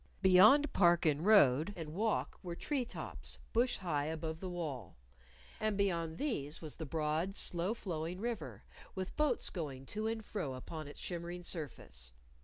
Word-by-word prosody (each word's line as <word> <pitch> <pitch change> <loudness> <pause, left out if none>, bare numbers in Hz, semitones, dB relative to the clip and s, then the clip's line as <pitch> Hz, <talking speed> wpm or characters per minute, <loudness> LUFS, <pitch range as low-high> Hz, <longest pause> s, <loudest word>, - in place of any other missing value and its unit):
Beyond 215 +11 +7
park 175 -2 +5
and 155 0 +2
road 185 -3 +5
and 155 -2 -6
walk 215 +4 0
were 175 -3 -5
tree 270 - -1
tops, - - -7 0.2
bush 240 +2 +3
high 150 -6 -1
above 160 0 -3
the 185 - -4
wall. 145 - -5 0.6
And 215 -2 0
beyond 170 -5 0
these 160 - -2
was 155 -3 -7
the 160 - -5
broad, 160 +5 0
slow 180 +6 0
flowing 175 -3 -4
river, 235 0 -4 0.3
with 190 -1 -4
boats 300 -1 +1
going 140 -7 -5
to 215 +1 -1
and 225 -1 -3
fro 140 -11 -3
upon 155 +4 -7
its 145 - -10
shimmering 175 0 -5
surface. 65 - -5
170 Hz, 160 wpm, -35 LUFS, 155-205 Hz, 0.6 s, Beyond